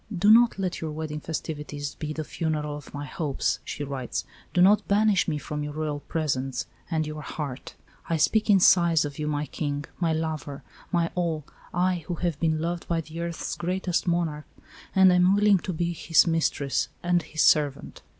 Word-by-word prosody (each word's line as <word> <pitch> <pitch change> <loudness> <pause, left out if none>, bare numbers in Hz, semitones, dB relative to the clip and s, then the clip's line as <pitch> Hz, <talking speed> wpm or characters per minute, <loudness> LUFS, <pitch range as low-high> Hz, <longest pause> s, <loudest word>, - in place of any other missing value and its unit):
"Do 205 +4 +5
not 235 0 +6
let 185 -2 -2
your 160 - -3
wedding 150 0 -4
festivities 150 -2 -5
be 155 -1 -5
the 155 +1 -3
funeral 150 -2 -2
of 145 -2 -10
my 145 0 -5
hopes," 145 0 -1
she 145 - -5
writes. 135 -3 -4 0.3
"Do - - 0
not 195 +4 +5
banish 205 -1 +3
me 155 -3 0
from 150 0 -5
your 150 0 -5
Royal 150 -1 -2
presence 135 -5 -2 0.2
and 160 -2 0
your 155 0 -6
heart. 145 -3 -6 0.3
I 165 - +1
speak 215 +8 +2
in 200 -2 +7
sighs 170 -3 +5
to 145 - -3
you, 150 +1 -3
my 150 0 -1
King, 145 -1 -3
my 170 -2 +1
lover, 155 -3 -3 0.3
my 170 -2 +1
all 165 -4 -1 0.3
I, 180 -1 0
who 175 - -2
have 170 -4 -2
been 160 -2 +1
loved 170 +1 -3
by 165 -1 0
the 160 +1 -9
earth's 170 -1 -3
greatest 180 0 -1
monarch, 165 -3 -1 0.5
and 190 -1 +7
am 180 +2 +5
willing 205 -1 +4
to 185 - -4
be 170 0 -1
his 165 -1 +4
mistress 140 -7 0
and 175 0 +2
his 155 0 -1
servant." 145 -3 +2
160 Hz, 190 wpm, -26 LUFS, 150-175 Hz, 0.5 s, in